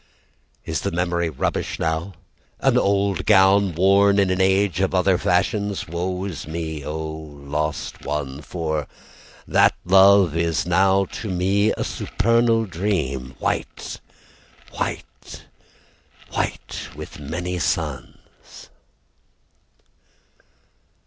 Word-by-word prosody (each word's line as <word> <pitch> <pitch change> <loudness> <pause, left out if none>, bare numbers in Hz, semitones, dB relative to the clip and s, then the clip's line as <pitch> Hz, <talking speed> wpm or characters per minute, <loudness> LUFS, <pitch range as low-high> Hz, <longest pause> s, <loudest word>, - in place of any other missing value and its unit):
Is - - -2
the - - -1
memory 85 0 -1
rubbish 75 - -2
now? 80 +4 -2 0.5
An - - +2
old 100 -2 +1
gown 95 -2 +5
Worn 100 +3 +4
in 100 -2 +3
an 95 +1 +1
age 95 -2 +2
of 95 0 +1
other 95 0 +3
fashions? 100 +3 0
Woe 90 +3 -3
is 85 -7 -6
me, 80 -2 -4
oh, 75 +3 -4
lost 75 -1 -5
one, 70 -1 -4
For 80 -2 -3 0.6
that - - +4
love 95 -2 +6
is 85 -1 0
now 95 +2 +3
to 105 +3 -7
me 95 +4 +2
A - - -1
supernal 115 +1 +1
dream, 80 -9 -2
White, - - -3 0.7
white, - - -6 0.9
white - - -4
with - - -9
many 90 +5 -4
suns. 75 - -5
90 Hz, 105 wpm, -22 LUFS, 80-100 Hz, 0.9 s, love